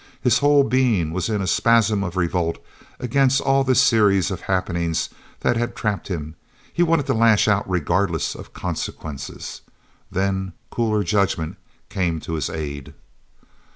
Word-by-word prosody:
His 125 -1 +3
whole 145 0 +5
being 115 - +1
was 95 +4 -1
in 105 -3 0
a - - -2
spasm 110 -1 +3
of 90 -1 -5
revolt 85 -1 0 0.4
against 135 +2 +2
all 135 0 +2
this 130 -2 +3
series 100 -5 +4
of 95 - -4
happenings 85 -3 -1 0.3
that 120 - +2
had 120 +1 -2
trapped 105 -3 -2
him; 80 -5 -4 0.4
he - - 0
wanted 165 -4 +3
to 135 - +1
lash 110 -2 +4
out 105 -2 +1
regardless 90 -1 0
of - - -11
consequences. 75 -4 -6 0.5
Then 95 -1 -1 0.2
cooler 110 -3 0
judgment 90 -4 0 0.3
came 85 -4 -1
to 80 - -6
his 80 - -1
aid. 70 -4 -6
100 Hz, 150 wpm, -22 LUFS, 85-120 Hz, 0.5 s, whole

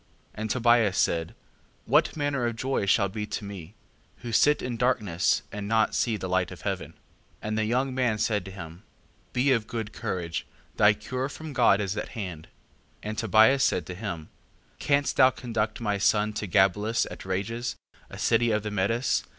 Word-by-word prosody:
5:12. - - -36 0.3
And 110 +1 -4
Tobias 120 -4 +3
said: 80 -1 0 0.5
What - - +2
manner 145 -4 0
of 115 - -3
joy 130 -3 -1
shall 100 0 +4
be 105 +2 -5
to 105 - -4
me, 100 -1 -9 0.5
who 120 - -4
sit 150 +6 +4
in 125 -1 -3
darkness 105 -8 +1
and 105 0 -5 0.2
see 115 - +1
not 105 - -3
the 95 - -4
light 90 -1 +1
of - - -10
heaven? - - -4
5:13. - - -31 0.5
And 110 +1 -2
the 110 - +1
young 130 +4 0
man 125 -4 +1
said 105 -1 0
to - - -7
him: 85 -2 -9 0.5
Be 130 +2 +2
of 115 -4 +1
good 110 -3 -5
courage, 85 -3 -4 0.3
thy 105 +1 +5
cure 130 +5 -4
from 155 +1 -8
God 115 -6 +4
is 100 -1 -2
at - - -4
hand. 90 -7 -6
5:14. - - -31 0.6
And 110 - -5
Tobias 115 +5 +5
said 85 - +1
to 90 - -6
him: 90 -5 -6 0.5
Canst 140 -2 +1
thou 130 -1 +7
conduct 115 -3 -3
my 105 -3 -1
son 105 +2 +2
to 105 - -4
Gabelus 100 +5 +2
at - - -8
Rages, 115 +6 -3 0.3
a - - -9
city 120 0 +2
of 105 -1 0
the 105 - -4
Medes? 115 +5 +1
110 Hz, 190 wpm, -27 LUFS, 100-120 Hz, 0.6 s, thou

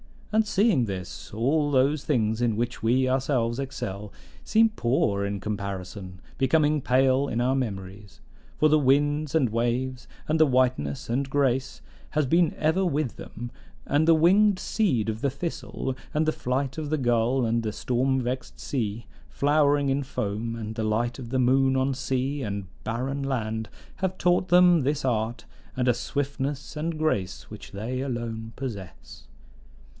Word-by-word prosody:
And, 220 0 +3
seeing 200 - +3
this, 95 +1 -6
all 145 +7 +1
those 140 +2 +2
things 110 -5 +1
in 115 -3 +2
which 120 +2 -2
we 125 +3 +2
ourselves 130 -2 0
excel 110 -7 -5 0.3
seem 225 0 +4
poor 120 - 0
in 100 -1 -3
comparison, 100 -2 -5 0.2
becoming 150 +2 +3
pale 130 +2 +3
in 120 - -1
our 125 +2 +2
memories. 100 -5 -5 0.4
For 155 - +4
the 155 0 +5
winds 145 +2 +2
and 135 -7 +3
waves, 120 +3 -1 0.2
and 155 +1 +2
the 155 - +7
whiteness 125 - +1
and 135 +3 -1
grace, 135 -2 0 0.3
has 150 -1 +1
been 165 +5 +2
ever 160 +5 +2
with 150 -6 -1
them; 120 +1 -8 0.3
and 150 +3 +2
the 165 - +7
winged 190 +5 +5
seed 165 - 0
of 110 0 -3
the 140 - +2
thistle, 135 -3 -4 0.2
and 155 0 +2
the 155 - +2
flight 135 +1 -2
of 155 -2 -3
the 155 - +1
gull, 120 0 +2
and 115 +1 +1
the 110 -2 -3
storm 130 +1 0
vexed 125 +1 -4
sea, 115 -4 -3 0.2
flowering 145 -1 +2
in 135 +1 +1
foam, 115 -3 -3
and 110 -1 -6
the 110 -1 -2
light 120 +3 0
of 120 -3 -7
the 130 +1 0
moon 130 +1 +3
on 130 +1 +1
sea 135 +1 -2
and 100 -4 -3 0.2
barren 130 +5 -2
land, 110 -5 -2 0.3
have 190 -1 -2
taught 180 +1 +2
them 180 -1 +6
this 145 +2 -1
art, 115 -1 -1 0.3
and 125 -1 +1
a - - +5
swiftness 140 +3 -3
and 160 +1 -2
grace 105 - -2
which 105 -2 -10
they 115 +6 -3
alone 115 -4 -4
possess. 105 -9 -8
130 Hz, 160 wpm, -26 LUFS, 115-145 Hz, 0.4 s, the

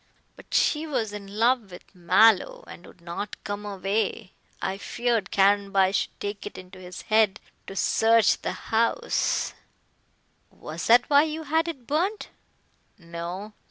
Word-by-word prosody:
But - - -17
she 310 +1 +2
was 235 -8 -2
in 200 0 -8
love 235 -2 +2
with 180 - -14
Mallow, 185 +3 +3
and 175 - -12
would 180 - -17
not 170 +4 -5
come 205 0 -5
away. 195 0 -2 0.3
I 195 +1 -3
feared 235 -2 -1
Caranby 195 -1 +3
should - - -2
take 205 0 -5
it - - -10
into 185 +1 -12
his 180 -1 -9
head 215 -2 +2 0.3
to 195 - -8
search 225 +3 +3
the - - -2 0.2
house 230 - +1 0.5
" - - -42
"Was - - -7
that 240 +2 +6
why 290 +1 +5
you 315 +1 -4
had 320 +3 +1
it 275 -8 -6
burnt?" 360 - -1 0.7
"No. 175 +4 -7
210 Hz, 150 wpm, -25 LUFS, 190-245 Hz, 0.7 s, that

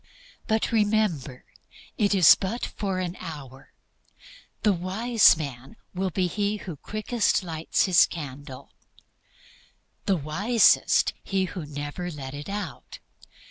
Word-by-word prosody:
But, 220 -1 0
remember, 205 - 0 0.5
it 205 -4 +2
is 180 -5 +8
but 210 +5 -3
for 195 -3 -4
an 180 -1 -3
hour. 135 -5 -9 0.9
The 210 -2 +4
wise 195 +4 +3
man 140 - -7 0.2
will 190 +1 -1
be 185 +1 -1
he 205 +3 -1
who 180 -5 -7
quickest 215 - -1
lights 160 -2 -1
his 185 -4 +5
candle, 140 -4 -9 1.4
the 195 - +3
wisest 195 - +3
he 195 -1 -1
who 170 -3 -7
never 145 +5 -5
lets 140 -5 -7
it 145 +4 -8
out. 205 +1 -6
185 Hz, 120 wpm, -25 LUFS, 150-205 Hz, 1.4 s, is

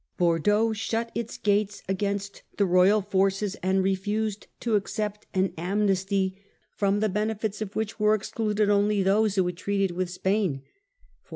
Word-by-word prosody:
57 - - -48
Bordeaux 205 +6 +2
shut 225 +2 -2
its 230 0 -4
gates 205 0 0
against 200 +1 -2 0.2
the 200 - +3
royal 185 +3 +4
forces, 195 0 +1
and 190 +1 +2
refused 205 +2 -1
to 235 - -2
accept 210 0 -2
an 190 0 +1
amnesty 195 0 0 0.3
from 200 0 +1
the 215 - +3
benefits 215 +1 -2
of 205 -2 -5
which 220 0 -3
were 210 0 +4
excluded 215 0 -1
only 205 0 +3
those 205 +2 +2
who 190 -2 +3
had 180 -1 -3
treated 195 0 0
with 180 +1 -2
Spain. 185 -6 -1
200 Hz, 155 wpm, -26 LUFS, 190-210 Hz, 0.3 s, royal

